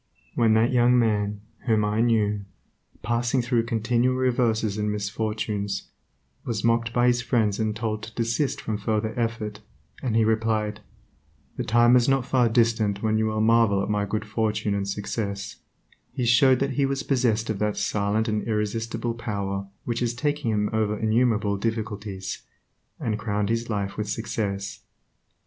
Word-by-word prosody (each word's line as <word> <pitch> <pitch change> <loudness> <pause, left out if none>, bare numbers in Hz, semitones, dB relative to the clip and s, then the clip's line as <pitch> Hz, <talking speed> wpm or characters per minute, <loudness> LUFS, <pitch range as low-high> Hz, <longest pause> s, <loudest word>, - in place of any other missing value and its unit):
When 110 -2 +3
that 115 +3 +3
young 125 0 +5
man, 105 -3 +1 0.3
whom 110 -2 +3
I 105 +2 +1
knew, 105 -4 +1 0.6
passing 120 +2 +1
through 120 -1 +1
continual 120 +3 +1
reverses 115 -5 +1
and 105 0 0
misfortunes, 105 -1 -3 0.5
was 110 -3 -3
mocked 115 0 +2
by 120 0 +2
his 125 0 +3
friends 115 -4 +1
and 110 -1 0
told 110 -1 -2
to 110 +1 -10
desist 115 +4 0
from 110 -2 -3
further 110 +1 -1
effort, 115 -3 -2 0.4
and 120 -4 -1
he 115 -1 +4
replied, 110 -1 0 0.8
"The - - -2
time 120 +2 +5
is 125 +1 +4
not 135 -2 +2
far 125 -3 +3
distant 110 -3 +1
when 110 0 +2
you 110 - +1
will 110 0 -1
marvel 110 -3 +4
at 105 - -2
my 105 -1 +1
good 105 +2 -3
fortune 110 -1 -1
and 100 -1 -1
success," 100 0 -4 0.5
he 125 - -2
showed 125 +2 +5
that 140 0 +1
he 140 +1 +1
was 135 +1 -2
possessed 115 -6 +1
of 100 - -4
that 105 -1 0
silent 105 +2 0
and 105 -1 0
irresistible 115 +2 -2
power 100 -4 -3 0.2
which 120 -1 -1
has 120 -1 -1
taken 145 0 -1
him 105 0 0
over 105 -1 0
innumerable 110 -2 +1
difficulties, 105 -3 -4 0.6
and 110 -2 -2
crowned 105 -1 -1
his 115 +1 -1
life 100 -2 -2
with 105 -1 -3
success. 100 -3 -3
110 Hz, 165 wpm, -25 LUFS, 105-120 Hz, 0.8 s, young